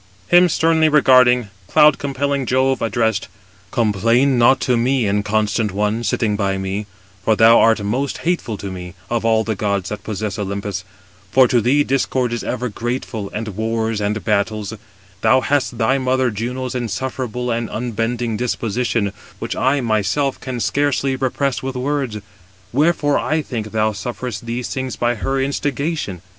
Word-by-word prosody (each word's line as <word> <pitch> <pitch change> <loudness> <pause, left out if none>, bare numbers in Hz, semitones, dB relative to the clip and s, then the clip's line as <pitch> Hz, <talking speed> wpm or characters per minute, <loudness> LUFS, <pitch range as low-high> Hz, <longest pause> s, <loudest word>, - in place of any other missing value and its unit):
Him 175 0 +6
sternly 160 0 +3
regarding, 125 -6 +5 0.2
cloud 150 +6 +5
compelling 140 -1 -1
Jove 130 0 +2
addressed: 115 -2 0 0.4
"Complain 115 +4 +2
not 130 +2 +5
to 125 - +2
me, 125 +1 +1
inconstant 105 +1 0
one, 105 +3 -1
sitting 110 -3 0
by 100 -2 0
me: 95 +2 -3 0.4
for 110 +2 +3
thou 115 +1 +6
art 110 -2 +4
most 125 +7 -1
hateful 150 - -1
to 100 0 -6
me, 90 0 -8 0.2
of 120 -1 0
all 110 -1 +3
the 110 - -1
gods 100 -2 -1
that 105 - -6
possess 105 -1 -4
Olympus: 100 -2 -3 0.5
for 130 +1 +6
to 120 -1 +2
thee 140 +6 +3
discord 130 -2 0
is 120 - -3
ever 125 0 -2
grateful, 115 -2 -4
and 110 +1 -4
wars 110 +1 -2
and 105 +2 -1
battles: 105 0 0 0.5
thou 130 - +5
hast 135 -3 0
thy 130 +4 +2
mother 130 -1 +1
Juno's 125 +4 -4
insufferable 125 +1 -3
and 115 -1 -2
unbending 115 0 -2
disposition, 115 -2 -1 0.2
which - - -4
I 135 +2 +1
myself 115 +5 0
can 130 -2 -5
scarcely 140 +1 0
repress 130 0 -1
with 130 0 -4
words. 130 -3 -2 0.6
Wherefore 145 +1 +2
I 155 0 0
think 110 -6 -5
thou 110 0 +1
sufferest 120 +2 -5
these 120 +1 -3
things 130 -1 -3
by 120 0 +1
her 135 +4 -2
instigation. 140 - -2
120 Hz, 155 wpm, -19 LUFS, 105-130 Hz, 0.6 s, Him